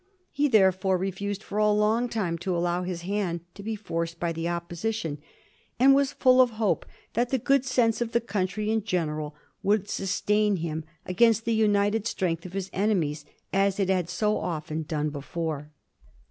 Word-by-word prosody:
He, 295 +1 +2
therefore, 190 -5 +3
refused 195 +2 -3
for 205 - -3
a 210 0 +4
long 215 +3 +2
time 180 -8 -2
to 180 0 -1
allow 175 +1 0
his 180 -2 -4
hand 185 -3 -1
to 200 - -10
be 220 +2 -3
forced 170 -5 -4
by 170 -1 0
the 165 +1 -2
Opposition, 170 -1 -3 0.6
and 270 +2 +7
was 280 0 +3
full 255 -2 +5
of 250 - +4
hope 220 -3 0 0.3
that 240 +2 +1
the 265 - +1
good 275 +2 +2
sense 235 -3 +2
of 235 -1 -1
the 235 - +3
country 210 -1 -2
in 220 -1 +1
general 155 -6 -2 0.3
would 205 0 +1
sustain 210 +2 +1
him 160 -2 -3 0.2
against 225 +4 +3
the 230 - +1
united 210 0 +2
strength 170 -4 -1
of 180 - -13
his 190 -1 -4
ene* 205 0 +2
mies, 150 -1 -3 0.3
as 195 0 +2
it 195 -1 +1
had 180 -3 +1
so 210 -1 0
often 160 -2 -3
done 150 -1 -2
before. 150 +1 -4
195 Hz, 180 wpm, -27 LUFS, 170-220 Hz, 0.6 s, and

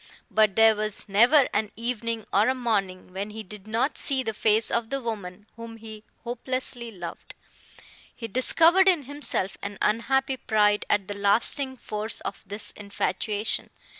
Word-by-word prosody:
But 215 -3 +3
there 225 0 +6
was 215 0 -3
never 240 +8 +5
an 210 0 0
evening 230 -1 -2
or 210 +5 +4
a 260 - +1
morning 195 -7 -2
when 200 +2 -4
he 220 +1 -7
did 205 +1 -11
not 230 +6 0
see 265 -2 +2
the 220 -2 -3
face 220 +1 +2
of 235 -1 0
the 275 +1 -1
woman 210 -5 -6
whom 230 0 -9
he 220 -1 -10 0.2
hopelessly 245 0 -2
loved. 175 -6 -9 0.8
He 230 - -6
discovered 330 - +4
in 350 -6 +4
himself 275 -8 -2
an 200 0 -6
unhappy 265 +5 +1
pride 210 -3 +2
at 200 -2 +1
the 205 - -4
lasting 230 +7 0
force 215 -1 -2
of 200 - -6
this 205 +2 -5
infatuation. 205 +1 -1
220 Hz, 160 wpm, -26 LUFS, 205-245 Hz, 0.8 s, there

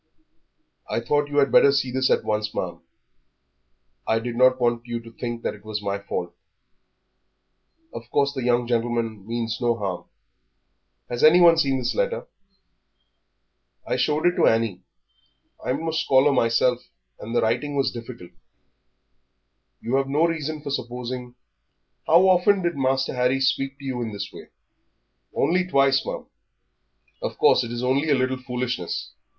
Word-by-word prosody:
"I - - 0
thought 145 +5 0
you 145 - -3
had 140 -1 +4
better 140 - +6
see 135 -2 0
this 130 +1 +1
at - - +2
once, 105 0 -2
ma'am. - - -4 1.3
I 110 - +2
did 115 +1 -4
not 130 +1 +4
want 120 -1 0
you 120 0 -3
to 115 0 -13
think 120 0 -6
it - - -4
was 110 -1 -4
my 100 -1 -3
fault. 90 -3 -5 1.6
Of - - -9
course 140 0 +1
the 130 - -4
young 120 0 +1
gentleman 115 -3 -2
means 115 0 -3
no 120 -1 +2
harm." 95 -4 -4 1.0
"Has 120 0 -3
anyone 170 +2 +7
seen 135 -4 +2
this 130 - -2
letter?" - - -1 1.6
"I - - -1
showed 150 +1 0
it 175 0 +3
to - - +4
Annie. 115 -5 +1 0.8
I'm 140 +6 -2
no 165 - -1
scholar 145 -3 +3
myself, 125 -1 +2 0.4
and 115 +3 -6
the - - +3
writing 125 +6 -1
was 135 -1 +1
difficult." 115 -6 -9 1.5
"You 125 +4 0
have 135 0 -1
no 150 +4 +3
reason 155 -2 -3
for 140 - -5
supposing 125 -1 -5 0.7
How 175 +4 +6
often 185 +1 +4
did 170 -2 0
Master 135 0 0
Harry 125 +1 +1
speak 135 +1 0
to 140 - -12
you 130 -2 -3
in 110 -2 -4
this 100 -1 -6
way?" - - -11 0.9
"Only 180 +1 +1
twice, 135 -4 +3
ma'am." - - -5 1.0
"Of - - -4
course - - +4
it 120 - -6
is 120 +1 -4
only 135 +5 +1
a 145 - +4
little 130 0 0
foolishness. 125 -7 -4
125 Hz, 155 wpm, -24 LUFS, 115-140 Hz, 1.6 s, anyone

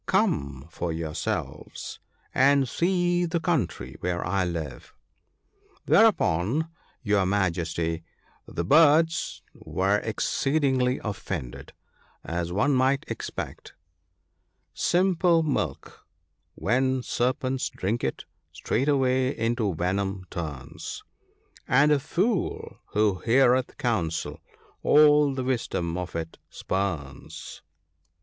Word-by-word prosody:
Come 70 - 0
for 85 +1 -3
yourselves, 80 -1 -4 0.3
and 140 0 +4
see 175 +2 +1
the 170 0 -1
country 110 - -2
where 90 -1 -2
I 95 +1 +1
live." 80 -5 -5 0.9
Thereupon, 155 - +3 0.3
your 105 -4 +2
Majesty, 85 -4 -1 0.4
the 85 - -3
birds 160 - +4
were 100 +2 0
excedingly 130 +3 0
offended, 95 - -5 0.5
as 85 0 -3
one 135 +10 +2
might 130 +1 +2
expect, - - -6 0.3
— 90 +2 -48
" - - -48 0.2
Simple 175 -2 +3
milk, 110 - -3 0.5
when 130 +3 +1
serpents 130 +2 -1
drink 110 +6 -2
it, 65 - -3 0.3
straightway 130 -2 +1
into 115 -4 0
venom 95 +2 -1
turns; 75 -7 -6 0.6
And 145 +4 +4
a 145 - +4
fool 190 - -1
who 105 -3 +2
heareth 130 +1 +3
counsel 90 -10 -1 0.4
all 150 -2 +5
the 130 - -2
wisdom 115 -9 -1
of 90 -1 -5
it 80 0 -5
spurns. 85 -9 -4
115 Hz, 100 wpm, -26 LUFS, 85-140 Hz, 0.9 s, all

